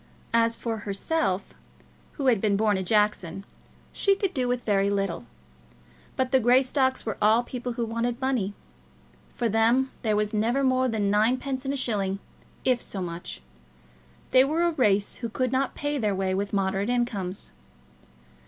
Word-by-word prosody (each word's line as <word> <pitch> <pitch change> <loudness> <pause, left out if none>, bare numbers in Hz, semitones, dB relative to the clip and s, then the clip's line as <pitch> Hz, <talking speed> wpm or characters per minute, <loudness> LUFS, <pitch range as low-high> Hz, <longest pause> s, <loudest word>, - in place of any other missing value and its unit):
As 230 0 +3
for 230 -2 -3
herself, 200 - -1 0.6
who 280 - -4
had 235 -6 +3
been 205 -2 +2
born 210 -1 +2
a 190 - -1
Jackson, 195 -2 0 0.5
she 395 -1 +3
could 390 -1 -2
do 255 -2 0
with 245 0 -1
very 200 -2 +2
little; 195 -9 -2 0.9
but 260 -1 -1
the 265 - +5
Greystocks 260 +2 +2
were 220 - -4
all 220 +3 +4
people 245 0 -5
who 235 0 -2
wanted 230 +2 -2
money. 245 -7 -1 0.8
For 235 - 0
them 230 +5 +2
there 215 -3 +1
was 210 0 0
never 235 +6 +1
more 260 0 +3
than 210 -4 0
ninepence 255 +5 +1
in 275 - 0
a - - -2
shilling, 200 -6 0 0.5
if 250 -2 +2
so 195 - -5
much. 170 - -6 0.9
They 255 - +7
were 310 +5 +1
a 345 - +3
race 210 -9 +1
who 235 - -4
could 255 +2 -1
not 265 0 0
pay 290 0 -2
their 210 -4 0
way 190 0 -1
with 200 +1 -2
moderate 195 +1 0
incomes. 210 -7 -2
230 Hz, 165 wpm, -26 LUFS, 200-260 Hz, 0.9 s, They